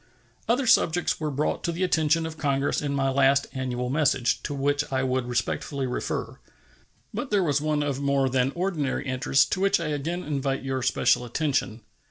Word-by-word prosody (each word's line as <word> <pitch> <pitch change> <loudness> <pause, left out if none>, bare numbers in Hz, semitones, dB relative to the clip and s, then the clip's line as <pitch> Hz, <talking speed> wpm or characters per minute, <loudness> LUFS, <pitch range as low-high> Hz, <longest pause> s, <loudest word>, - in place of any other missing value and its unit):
Other 250 +3 +2
subjects 175 -6 +3
were 155 -1 -2
brought 145 +2 -1
to 170 - 0
the 170 +3 -2
attention 160 -2 +2
of 160 -1 -5
Congress 140 -1 0
in 145 -1 -2
my 135 -1 +1
last 140 +1 +3
annual 125 -1 -3
message, 130 -5 +1
to 145 - -4
which 145 +1 +1
I 130 0 0
would 130 -1 -1
respectfully 130 +3 -2
refer. 125 - -4 0.7
But 245 +5 -4
there 205 -2 +2
was 145 -4 +1
one 150 -1 0
of 140 -1 -2
more 140 -1 +2
than 130 +1 +1
ordinary 170 -6 -1
interest, 130 +1 +2
to 185 - 0
which 195 -1 +3
I 165 -2 -3
again 160 +5 -3
invite 135 -2 -2
your 135 -1 -2
special 125 -1 +2
attention. 130 -2 -1
140 Hz, 185 wpm, -26 LUFS, 130-155 Hz, 0.7 s, subjects